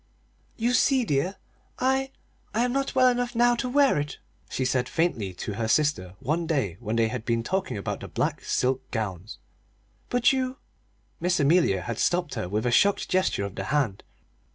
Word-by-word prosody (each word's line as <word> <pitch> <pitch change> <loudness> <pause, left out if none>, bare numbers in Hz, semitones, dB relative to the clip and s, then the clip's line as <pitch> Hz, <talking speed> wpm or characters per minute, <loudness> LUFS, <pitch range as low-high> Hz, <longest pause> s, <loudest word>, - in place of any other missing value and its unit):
"You 240 +2 +1
see, 260 0 +3
dear, 150 +4 0 0.4
I 265 +1 +1 0.5
I 235 +2 +3
am 245 - -1
not 275 0 -1
well 255 -1 +6
enough 245 -1 0
now 240 +1 +4
to 250 +1 -2
wear 275 - +4
it," 145 0 -4 0.3
she 130 - -2
said 125 -1 0
faintly 140 - 0
to 105 - -5
her 110 +2 -2
sister 110 -9 +1
one 160 +5 -1
day 130 - -1
when 110 -1 -3
they 115 -1 +3
had 125 -1 -4
been 115 -1 0
talking 190 - -2
about 100 - -4
the - - -8
black - - -2
silk 130 +1 0
gowns; 105 -3 -4 0.7
"but 245 +3 +3
you 260 0 -1 0.3
" - - -40
Miss 180 0 +1
Amelia 145 - +3
had 115 +1 -4
stopped 175 -3 +1
her 110 -8 -3
with 105 +4 -1
a 120 - +2
shocked 200 +11 +3
gesture 185 - +1
of 100 - -6
the - - -5
hand. 135 -9 0
150 Hz, 190 wpm, -26 LUFS, -, 0.7 s, well